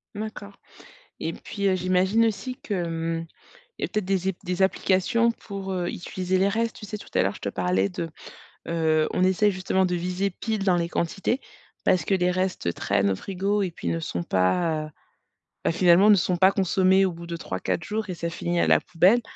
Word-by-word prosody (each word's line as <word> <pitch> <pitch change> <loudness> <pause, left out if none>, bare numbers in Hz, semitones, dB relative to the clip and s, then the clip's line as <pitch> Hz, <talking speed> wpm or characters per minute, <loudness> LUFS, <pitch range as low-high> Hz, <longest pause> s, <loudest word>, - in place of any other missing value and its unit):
D'accord 210 -1 -6 0.7
et - - -3
puis, 200 -2 -3
heu, 190 - +3
j'imagine 185 +5 +2
aussi 250 +4 -4
que, 210 - -4
hem, 165 -1 -2 0.5
il - - -11
y - - +2
a - - -1
peut-être 215 -2 -2
des 190 -1 0
é - - -4
des 180 +1 -1
applications 195 +5 +2
pour, 195 -4 -6
heu, 180 -2 -1
utiliser 185 +1 -2
les 195 +2 +3
restes. 225 +2 -1
Tu 210 - -9
sais, 210 - -5
tout 210 - -12
à - - +3
l'heure, 100 +1 0
je - - -12
te 100 - -3
parlais 95 +1 0
de, 165 - -4 0.6
heu, 160 -2 +2
on 185 - +2
essaie 195 +3 +3
justement 190 0 0
de 180 -1 0
viser 180 +3 -1
pile 215 +2 -3
dans 185 -2 +3
les 170 -1 0
quantités, 195 +10 -1 0.4
parce 180 -4 +3
que 195 - +1
les 180 -1 +2
restes 185 - -1
traînent 100 0 +1
au 95 - 0
frigo 200 - -1
et 180 - -2
puis 90 - -5
ne 85 0 0
sont 85 +1 -3
pas, 155 - +1
heu, - - -9 0.8
ben, - - +3
finalement, 175 +3 +5
ne 210 - +8
sont 180 -1 +1
pas 190 +2 +6
consommés 190 0 +3
au 185 - 0
bout 170 +1 -9
de 170 0 -4
3-4 165 - -3
jours 215 +2 -3
et 185 - -3
ça 170 0 -3
finit 175 +1 -2
à - - +3
la - - +5
poubelle 185 +7 +3
185 Hz, 215 wpm, -25 LUFS, 170-200 Hz, 0.8 s, ne